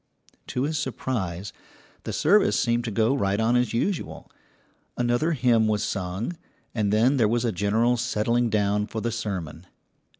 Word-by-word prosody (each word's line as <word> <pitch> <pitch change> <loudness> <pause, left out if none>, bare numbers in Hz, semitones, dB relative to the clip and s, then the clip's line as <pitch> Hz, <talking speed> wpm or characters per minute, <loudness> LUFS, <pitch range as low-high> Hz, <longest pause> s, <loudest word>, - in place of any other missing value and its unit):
To 125 - -2
his 150 +1 -1
surprise, 105 - -3 0.5
the - - -3
service 200 +6 +3
seemed 120 0 +1
to - - -2
go 115 +5 +2
right 100 -5 0
on 115 +2 +2
as 125 -3 +2
usual. 165 - -3 0.7
Another 120 +7 +1
hymn 120 -5 +3
was 105 -1 0
sung, 95 - -3 0.4
and 105 -3 0
then 120 +6 +3
there 115 -4 +4
was 120 +2 0
a 115 - +1
general 110 +6 +1
settling 120 0 0
down 105 -1 +1
for 110 - -4
the 115 +2 -2
sermon. 90 -7 -5
115 Hz, 160 wpm, -25 LUFS, 105-125 Hz, 0.7 s, there